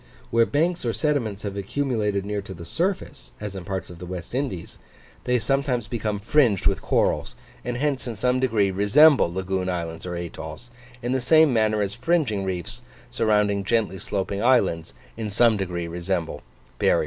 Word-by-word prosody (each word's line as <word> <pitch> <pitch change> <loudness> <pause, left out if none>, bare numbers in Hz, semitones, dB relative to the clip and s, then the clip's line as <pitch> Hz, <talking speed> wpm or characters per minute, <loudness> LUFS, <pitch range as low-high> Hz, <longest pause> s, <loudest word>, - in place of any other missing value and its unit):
Where 115 0 +4
banks 170 +4 0
or 115 -2 0
sediments 120 -10 -1
have 100 -1 -4
accumulated 105 -2 -1
near 105 0 -2
to 95 -1 -9
the 85 0 -9
surface, 165 - -3
as 105 -2 -5
in 95 - -6
parts 95 -2 -4
of 85 - -11
the 90 - -8
West 90 +1 -7
Indies, 125 -10 -3 0.5
they 125 0 +2
sometimes 125 0 0
become 105 -2 -2
fringed 110 -1 +2
with - - +2
corals, - - 0 0.3
and 125 0 -3
hence 140 -1 -1
in 120 - -4
some 125 +4 +1
degree 110 -6 +2
resemble 105 - +5
lagoon 95 0 -2
islands 85 -1 -4
or 90 - -4
atolls, 85 +5 -7 0.3
in 120 - -1
the 130 0 +1
same 155 +2 +5
manner 110 -2 +2
as 100 - -3
fringing 145 - 0
reefs, 95 +6 -4 0.3
surrounding 105 -4 +2
gently 105 -2 0
sloping 100 +1 -2
islands, 100 -10 +2 0.2
in 110 -2 -3
some 115 +2 +4
degree 90 -4 -3
resemble 85 -2 -3 0.4
barrier - - +4
reefs. - - +2
105 Hz, 175 wpm, -24 LUFS, 95-125 Hz, 0.5 s, resemble